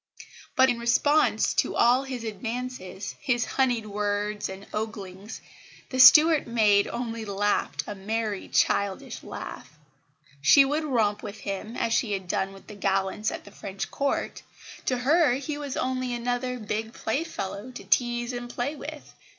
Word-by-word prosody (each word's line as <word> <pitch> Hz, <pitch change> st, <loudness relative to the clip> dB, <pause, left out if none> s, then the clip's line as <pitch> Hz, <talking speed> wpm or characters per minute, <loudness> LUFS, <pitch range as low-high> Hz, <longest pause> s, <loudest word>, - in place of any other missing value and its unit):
But, 260 Hz, 0 st, +5 dB
in 235 Hz, -, -3 dB
response 290 Hz, +6 st, +3 dB
to -, -, 0 dB
all 245 Hz, +2 st, +5 dB
his 255 Hz, -3 st, -5 dB
advances, 225 Hz, -2 st, -5 dB
his 240 Hz, -3 st, 0 dB
honeyed 245 Hz, -4 st, +1 dB
words 210 Hz, 0 st, -2 dB
and 190 Hz, +1 st, -8 dB
oglings, 205 Hz, -1 st, -5 dB, 0.5 s
the 260 Hz, -, -2 dB
Stuart 305 Hz, +4 st, +8 dB
maid 210 Hz, -4 st, +4 dB
only 230 Hz, -2 st, -4 dB
laughed 205 Hz, 0 st, 0 dB
a 210 Hz, -, -5 dB
merry 210 Hz, +1 st, -3 dB
childish 200 Hz, -1 st, 0 dB
laugh. 65 Hz, -, -8 dB, 0.6 s
She 275 Hz, -, +7 dB
would 300 Hz, +3 st, -1 dB
romp 220 Hz, -7 st, +1 dB
with 210 Hz, 0 st, -8 dB
him, 205 Hz, +4 st, -5 dB
as 230 Hz, -, 0 dB
she 230 Hz, -3 st, +1 dB
had 190 Hz, -2 st, -4 dB
done 190 Hz, +2 st, -1 dB
with 195 Hz, 0 st, -14 dB
the 215 Hz, -, -10 dB
gallants 195 Hz, +1 st, 0 dB
at -, -, -6 dB
the 200 Hz, -, -14 dB
French 195 Hz, -1 st, -6 dB
Court; 280 Hz, 0 st, -2 dB, 0.5 s
to 255 Hz, -, +2 dB
her 290 Hz, +3 st, +4 dB
he 285 Hz, +3 st, -3 dB
was 285 Hz, -3 st, -4 dB
only 255 Hz, -1 st, -1 dB
another 245 Hz, +1 st, -2 dB
"big 220 Hz, 0 st, -4 dB
playfellow" 220 Hz, -, -3 dB
to 255 Hz, -, -9 dB
tease 240 Hz, 0 st, +1 dB
and 240 Hz, 0 st, -5 dB
play 250 Hz, +5 st, -3 dB
with. 300 Hz, 0 st, -9 dB
230 Hz, 155 wpm, -26 LUFS, 205-255 Hz, 0.6 s, Stuart